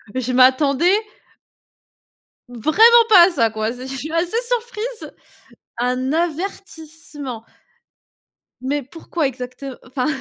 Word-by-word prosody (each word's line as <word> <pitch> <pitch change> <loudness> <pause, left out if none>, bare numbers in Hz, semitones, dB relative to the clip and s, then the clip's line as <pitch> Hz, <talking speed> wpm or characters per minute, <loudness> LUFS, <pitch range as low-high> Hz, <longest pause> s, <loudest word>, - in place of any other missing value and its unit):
je 255 -1 -2
m'attendais 270 +6 +4 1.6
vraiment 440 - +5
pas 360 -4 +8
à - - -2
ça, 230 -8 +1
quoi! 220 +1 -3
C 255 +1 -9
je 270 - -6
suis 305 +4 -6
assez 340 +6 -1
surprise. 475 -1 -4 0.7
Un 250 +2 -1
avertissement. 320 - -5 1.2
Mais 280 +3 -2
pourquoi 320 +3 -4
exact 255 +1 -7 0.2
enfin? 255 0 -3
290 Hz, 105 wpm, -20 LUFS, 255-350 Hz, 1.6 s, pas